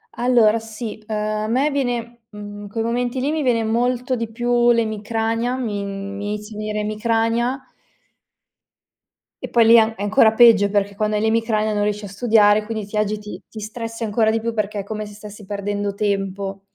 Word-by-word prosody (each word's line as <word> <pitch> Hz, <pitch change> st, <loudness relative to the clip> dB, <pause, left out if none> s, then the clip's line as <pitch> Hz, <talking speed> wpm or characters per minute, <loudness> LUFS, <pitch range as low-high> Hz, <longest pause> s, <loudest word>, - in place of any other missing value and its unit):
Allora, 235 Hz, -3 st, +3 dB
sì. 220 Hz, -1 st, -7 dB
Uhm, 220 Hz, -, -3 dB
a 215 Hz, 0 st, -2 dB
me 270 Hz, +6 st, +1 dB
viene 240 Hz, -4 st, -3 dB
mhmm, 205 Hz, -1 st, -9 dB
in 205 Hz, -, -9 dB
quei 225 Hz, +1 st, -2 dB
momenti 245 Hz, +2 st, -1 dB
lì 280 Hz, +4 st, 0 dB
mi 315 Hz, -1 st, -1 dB
viene 240 Hz, -4 st, +2 dB
molto 245 Hz, +3 st, 0 dB
di 230 Hz, -2 st, -4 dB
più 240 Hz, +1 st, +2 dB
l'emicrania. 225 Hz, +2 st, -1 dB
Mi 210 Hz, -5 st, -3 dB
mi 200 Hz, +1 st, -5 dB
inizia 210 Hz, 0 st, -7 dB
a -, -, -6 dB
venire 215 Hz, 0 st, -3 dB
emicrania 230 Hz, +4 st, -1 dB, 1.8 s
e -, -, -9 dB
poi 235 Hz, -1 st, +4 dB
lì 230 Hz, -, +7 dB
è 235 Hz, -, +9 dB
an 220 Hz, 0 st, +2 dB
è -, -, -7 dB
ancora 215 Hz, +2 st, +5 dB
peggio, 220 Hz, -3 st, +6 dB
perché 200 Hz, 0 st, 0 dB
quando 215 Hz, 0 st, 0 dB
hai -, -, -1 dB
l'emicrania 220 Hz, -1 st, +1 dB
non 205 Hz, 0 st, 0 dB
riesci 210 Hz, 0 st, -2 dB
a -, -, -6 dB
studiare. 210 Hz, 0 st, +3 dB
Quindi 220 Hz, -1 st, -4 dB
ti 205 Hz, -, -9 dB
agiti, 210 Hz, 0 st, -2 dB
ti 220 Hz, -, -9 dB
stressi 230 Hz, +1 st, -5 dB
ancora 220 Hz, +1 st, +2 dB
di 225 Hz, -, 0 dB
più, 230 Hz, +1 st, -3 dB
perché 210 Hz, -1 st, -2 dB
è -, -, -3 dB
come 215 Hz, 0 st, -5 dB
se 205 Hz, -, -11 dB
stessi 210 Hz, 0 st, -11 dB
perdendo 205 Hz, 0 st, -3 dB
tempo. 195 Hz, -1 st, -2 dB
220 Hz, 195 wpm, -21 LUFS, 210-230 Hz, 1.8 s, è